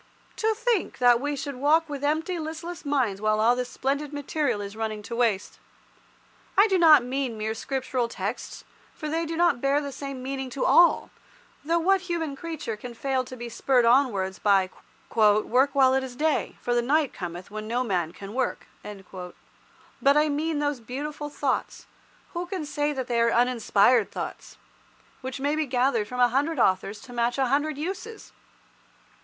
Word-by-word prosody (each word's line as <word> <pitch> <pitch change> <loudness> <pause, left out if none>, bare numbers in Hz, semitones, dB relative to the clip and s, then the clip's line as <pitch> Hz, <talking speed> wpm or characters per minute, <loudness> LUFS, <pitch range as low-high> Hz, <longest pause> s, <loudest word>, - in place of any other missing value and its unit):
To 440 0 +1
think 465 -3 0
that 245 -1 +5
we 290 +1 -1
should 280 -1 -5
walk 310 +5 +3
with 285 -2 -6
empty, 320 +4 0
listless 325 +2 -6
minds 255 -9 0
while 215 0 +2
all 235 +3 +4
this 250 0 -3
splendid 280 +3 -2
material 285 -5 -1
is 200 0 -6
running 215 -1 -4
to 235 +2 -6
waste. 225 -5 0 1.0
I 405 +3 +7
do 380 -3 +2
not 310 -6 +7
mean 255 -2 -2
mere 215 +1 -2
Scriptural 255 0 -2
texts, 210 +1 -5 0.3
for 305 - -6
they 325 +2 -1
do 325 0 -4
not 345 -8 +3
bear 275 +1 +2
the 285 -1 -5
same 275 -2 -6
meaning 265 0 -4
to 255 +1 -2
all, 345 - +5 0.5
though 330 +3 +1
what 380 +3 +3
human 335 -5 -3
creature 315 -7 -5
can 235 +3 -9
fail 265 +1 -1
to 255 0 -9
be 240 0 -6
spurred 245 +1 +2
onwards 230 -7 +2
by 195 -2 +3 0.4
"Work 230 +6 +3
while 260 -1 +5
it 265 0 +1
is 255 -2 -7
day, 305 +3 0
for 245 - -1
the 240 - +3
night 290 +3 +1
cometh 175 +1 -7
when 215 0 -6
no 245 +3 0
man 180 -8 -1
can 195 +3 -10
work." 260 0 -2 0.2
But 195 +7 -4
I 300 0 +3
mean 305 +2 -1
those 290 -2 -1
beautiful 295 +5 -5
thoughts—who 345 +3 -5
can 360 -4 -4
say 295 0 -1
that 265 -3 -3
they 235 -1 0
are 230 - +4
uninspired 240 -1 +3
thoughts?—which 260 +1 -9
may 285 +2 0
be 310 -1 -1
gathered 245 -4 +1
from 250 +3 -6
a 245 -1 +5
hundred 285 +6 0
authors 195 -1 +1
to 245 - -12
match 240 +1 0
a 265 -2 +1
hundred 290 +2 0
uses. 390 +8 -6
265 Hz, 175 wpm, -26 LUFS, 235-300 Hz, 1.0 s, I